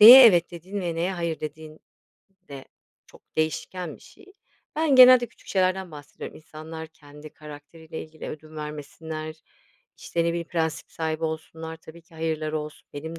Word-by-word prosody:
Neye 245 Hz, +4 st, +13 dB
"evet" 175 Hz, -5 st, +5 dB
dediğin 185 Hz, +4 st, -6 dB
ve 175 Hz, -2 st, -2 dB
neye 175 Hz, +3 st, 0 dB
"hayır" 170 Hz, -3 st, -2 dB
dediğin 155 Hz, 0 st, -7 dB, 0.7 s
de 135 Hz, -2 st, -8 dB, 0.4 s
çok -, -, -18 dB
değişken 155 Hz, +1 st, -2 dB
bir -, -, -23 dB
şey. 405 Hz, -, -17 dB, 0.5 s
Ben 310 Hz, -3 st, +3 dB
genelde 255 Hz, -1 st, +9 dB
küçük -, -, -22 dB
şeylerden 185 Hz, -1 st, +1 dB
bahsediyorum. 145 Hz, -2 st, -9 dB
İnsanlar 160 Hz, +1 st, -9 dB
kendi 150 Hz, -1 st, -13 dB
karakteriyle 150 Hz, +2 st, -10 dB
ilgili 155 Hz, -1 st, -9 dB
ödün 155 Hz, +1 st, -9 dB
vermesinler, 155 Hz, +1 st, -6 dB, 0.6 s
işte, 170 Hz, -1 st, -1 dB
ne -, -, +2 dB
bileyim 170 Hz, 0 st, -2 dB
prensip 160 Hz, -2 st, -2 dB
sahibi 160 Hz, 0 st, -2 dB
olsunlar, 160 Hz, +1 st, -5 dB
tabii 160 Hz, +1 st, -14 dB
ki 165 Hz, -, -22 dB
"hayır"ları 155 Hz, -1 st, -1 dB
olsun, 150 Hz, 0 st, -9 dB
benim 160 Hz, +3 st, -6 dB
160 Hz, 155 wpm, -26 LUFS, 155-170 Hz, 0.7 s, Neye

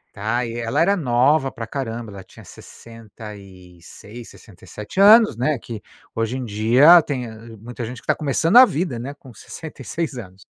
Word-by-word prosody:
Ai 115 Hz, +4 st, -2 dB
e 120 Hz, -, -6 dB
ela 115 Hz, +5 st, -2 dB
era 195 Hz, +5 st, +3 dB
nova 135 Hz, -1 st, +1 dB
pra 115 Hz, -, -7 dB
caramba, 115 Hz, -4 st, -6 dB
ela 95 Hz, -1 st, -11 dB
tinha -, -, -17 dB
66, 105 Hz, -1 st, -14 dB
67 105 Hz, -, -11 dB
anos, 215 Hz, -, +6 dB
né, 135 Hz, +5 st, -1 dB
que, 115 Hz, -2 st, -9 dB, 0.3 s
hoje 115 Hz, +3 st, -3 dB
em 130 Hz, -, -5 dB
dia 120 Hz, +11 st, +5 dB
tem 135 Hz, -5 st, -5 dB, 0.3 s
muita 120 Hz, +3 st, -9 dB
gente 120 Hz, +2 st, -7 dB
que -, -, -14 dB
está -, -, +1 dB
começando 160 Hz, -, +1 dB
a 255 Hz, -, +10 dB
vida, 150 Hz, -, -4 dB
né, 135 Hz, +4 st, -7 dB
com 135 Hz, -4 st, -16 dB
66 155 Hz, +5 st, -7 dB
anos. 95 Hz, -6 st, -11 dB
120 Hz, 165 wpm, -20 LUFS, 110-145 Hz, 0.3 s, a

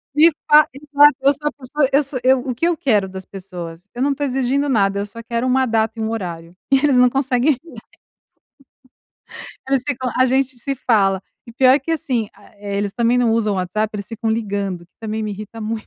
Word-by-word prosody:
me 320 Hz, +3 st, +6 dB, 0.2 s
fa" 300 Hz, 0 st, +8 dB
exato, 290 Hz, +1 st, +4 dB
eu 275 Hz, +1 st, +5 dB
sou 295 Hz, +1 st, -4 dB
a -, -, 0 dB
pessoa 275 Hz, +1 st, -1 dB
eu 280 Hz, -, +5 dB
sou 275 Hz, -1 st, -4 dB
eu 260 Hz, +1 st, +4 dB
o 250 Hz, -1 st, -4 dB
que 330 Hz, -, 0 dB
eu 345 Hz, -, +1 dB
quero 215 Hz, -10 st, +1 dB
das 190 Hz, 0 st, -8 dB
pessoas? 180 Hz, -2 st, -9 dB
Eu 245 Hz, -, -5 dB
não 280 Hz, -, +2 dB
estou 290 Hz, +1 st, -3 dB
exigindo 270 Hz, +2 st, 0 dB
nada, 200 Hz, -6 st, +1 dB
eu 200 Hz, -, -2 dB
só 230 Hz, +3 st, -10 dB
quero 235 Hz, +1 st, -3 dB
uma 260 Hz, 0 st, +2 dB
data 225 Hz, 0 st, 0 dB
e -, -, -2 dB
um 220 Hz, -, -1 dB
horário, 175 Hz, -6 st, -6 dB, 0.2 s
e -, -, +7 dB
eles 280 Hz, -2 st, +3 dB
não 250 Hz, 0 st, +6 dB
conseguem 265 Hz, +1 st, +1 dB, 2.1 s
Eles 270 Hz, -2 st, +1 dB
ficam: 260 Hz, -3 st, -2 dB
"A 255 Hz, -, +4 dB
gente 260 Hz, 0 st, 0 dB
se 275 Hz, +3 st, -3 dB
fala", 195 Hz, -7 st, +1 dB, 0.2 s
e 235 Hz, -, -11 dB
pior 260 Hz, +3 st, +5 dB
que 315 Hz, +4 st, -4 dB
assim, 250 Hz, -8 st, -1 dB
a -, -, -19 dB
eh, 200 Hz, -1 st, -5 dB
eles 200 Hz, -1 st, -2 dB
também 235 Hz, +1 st, +1 dB
não 240 Hz, -2 st, +2 dB
usam 215 Hz, -2 st, +1 dB
o -, -, -3 dB
WhatsApp, 185 Hz, +4 st, -1 dB
eles 200 Hz, -1 st, -6 dB
ficam 225 Hz, 0 st, -4 dB
ligando, 200 Hz, -5 st, -2 dB
que 175 Hz, -, -32 dB
também 220 Hz, 0 st, -3 dB
me 215 Hz, -, -3 dB
irrita 215 Hz, +3 st, -8 dB
muito, 220 Hz, 0 st, -4 dB
235 Hz, 225 wpm, -19 LUFS, 205-270 Hz, 2.1 s, fa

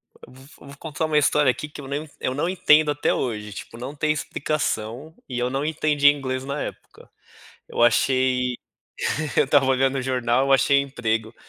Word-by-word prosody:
Vo -, -, -16 dB
vo 135 Hz, +2 st, -16 dB
vou 140 Hz, 0 st, -11 dB
contar 160 Hz, 0 st, -4 dB
uma 150 Hz, -1 st, +2 dB
história 145 Hz, -1 st, +3 dB
aqui, 150 Hz, +4 st, -4 dB
que 145 Hz, -, -10 dB
eu 135 Hz, -, -9 dB
não 145 Hz, +2 st, -4 dB
eu 130 Hz, -, -2 dB
não 155 Hz, +5 st, -1 dB
entendo 155 Hz, -4 st, +4 dB
até 145 Hz, 0 st, 0 dB
hoje, 105 Hz, -4 st, -3 dB
tipo 115 Hz, +3 st, -9 dB
não 130 Hz, +4 st, -6 dB
tem 150 Hz, +1 st, +1 dB
explicação, 150 Hz, -2 st, -3 dB
e 125 Hz, -1 st, -4 dB
eu 125 Hz, 0 st, 0 dB
não 135 Hz, +2 st, -2 dB
entendia 150 Hz, -2 st, +3 dB
inglês 130 Hz, -2 st, -3 dB
na 140 Hz, +2 st, -4 dB
época. -, -, -9 dB, 0.6 s
Eu -, -, -1 dB
achei 125 Hz, +1 st, +2 dB, 0.8 s
eu -, -, +5 dB
estava 140 Hz, 0 st, +3 dB
olhando 135 Hz, +1 st, +2 dB
o -, -, -2 dB
jornal, 125 Hz, 0 st, +1 dB
eu 135 Hz, -, +3 dB
achei 140 Hz, +1 st, +4 dB
emprego, 115 Hz, -5 st, -2 dB
135 Hz, 190 wpm, -23 LUFS, 125-145 Hz, 0.8 s, eu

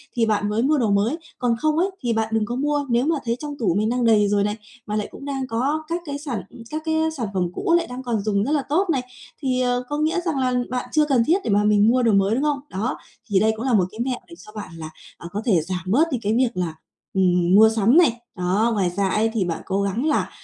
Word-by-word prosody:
thì 235 Hz, -2 st, +2 dB
bạn 210 Hz, -1 st, 0 dB
mới 220 Hz, +3 st, 0 dB
mua 300 Hz, +3 st, +3 dB
đồ 235 Hz, -6 st, +1 dB
mới, 210 Hz, +9 st, +1 dB, 0.2 s
còn 245 Hz, -2 st, +1 dB
không 310 Hz, 0 st, +1 dB
ấy 365 Hz, +4 st, +2 dB
thì 240 Hz, -2 st, +1 dB
bạn 220 Hz, 0 st, 0 dB
đừng 220 Hz, -1 st, +1 dB
có 240 Hz, -, -4 dB
mua. 290 Hz, +2 st, 0 dB
Nếu 240 Hz, +2 st, +2 dB
mà 325 Hz, +2 st, +2 dB
thấy 235 Hz, 0 st, 0 dB
trong 295 Hz, 0 st, -6 dB
tủ 190 Hz, -7 st, +1 dB
mình 215 Hz, +1 st, +1 dB
đang 245 Hz, 0 st, 0 dB
đầy 215 Hz, -2 st, +4 dB
rồi 200 Hz, 0 st, +2 dB
này, 210 Hz, +1 st, -1 dB, 0.3 s
mà 210 Hz, -, -2 dB
lại 210 Hz, -, -1 dB
cũng 280 Hz, -, -10 dB
đang 270 Hz, -2 st, -3 dB
có 275 Hz, +7 st, -1 dB
các 340 Hz, +1 st, -2 dB
cái 285 Hz, -2 st, -4 dB
sản 265 Hz, -9 st, -4 dB, 0.3 s
các 310 Hz, +1 st, -4 dB
cái, 315 Hz, 0 st, 0 dB
ơ, 320 Hz, 0 st, +2 dB
sản 235 Hz, -4 st, -2 dB
phẩm 180 Hz, -2 st, 0 dB
cũ 335 Hz, -, 0 dB
lại 340 Hz, -, -2 dB
đang 250 Hz, +1 st, -7 dB
còn 230 Hz, -5 st, -1 dB
dùng 205 Hz, -2 st, +1 dB
rất 270 Hz, -, -2 dB
là 295 Hz, -3 st, +1 dB
tốt 355 Hz, +6 st, +1 dB
này, 270 Hz, -5 st, +1 dB, 0.4 s
thì, 255 Hz, -2 st, 0 dB
ờ, 245 Hz, 0 st, 0 dB
có 295 Hz, -, -2 dB
nghĩa 315 Hz, +4 st, +1 dB
rằng 315 Hz, -6 st, -1 dB
là 255 Hz, -1 st, +1 dB, 0.2 s
bạn 250 Hz, 0 st, -3 dB
chưa 305 Hz, +1 st, +3 dB
cần 265 Hz, -6 st, +3 dB
thiết 345 Hz, +4 st, +4 dB
để -, -, -3 dB
mà 205 Hz, +1 st, +3 dB
mình 210 Hz, 0 st, +4 dB
mua 250 Hz, +1 st, +3 dB
đồ 230 Hz, -, +4 dB
mới, 195 Hz, +3 st, +3 dB
đúng 270 Hz, -, 0 dB
không? 295 Hz, -2 st, +1 dB
Đó, 215 Hz, +7 st, -2 dB, 0.3 s
thì 200 Hz, -2 st, +3 dB
đây 220 Hz, +2 st, +3 dB
cũng 225 Hz, +3 st, -5 dB
là 255 Hz, -, +1 dB
một 185 Hz, -4 st, +4 dB
cái 220 Hz, -, -12 dB
mẹo 250 Hz, 0 st, -1 dB
để 335 Hz, -, -12 dB
cho 215 Hz, -, -13 dB
bạn 210 Hz, -, -6 dB
là, 160 Hz, -1 st, -7 dB, 0.3 s
à, 170 Hz, -, -9 dB
có 205 Hz, -, -3 dB
thể 185 Hz, -9 st, +3 dB
giảm 180 Hz, +2 st, -4 dB
bớt 290 Hz, -, +3 dB
đi 255 Hz, -, 0 dB
cái 210 Hz, +2 st, 0 dB
việc 250 Hz, 0 st, +3 dB
là, 170 Hz, -3 st, -1 dB, 0.4 s
ừm, 180 Hz, -1 st, +3 dB
mua 220 Hz, +2 st, +8 dB
sắm 225 Hz, -, +3 dB
này. 305 Hz, -10 st, +4 dB, 0.2 s
Đó, 190 Hz, +6 st, +1 dB
ngoài 190 Hz, -4 st, +1 dB
ra 190 Hz, +2 st, -1 dB
ấy 220 Hz, +3 st, +1 dB
thì 200 Hz, -5 st, 0 dB
bạn 165 Hz, -2 st, -3 dB
cố 195 Hz, +1 st, -1 dB
gắng 200 Hz, +7 st, -1 dB
là, 310 Hz, -, +1 dB
235 Hz, 290 wpm, -22 LUFS, 205-280 Hz, 0.4 s, mua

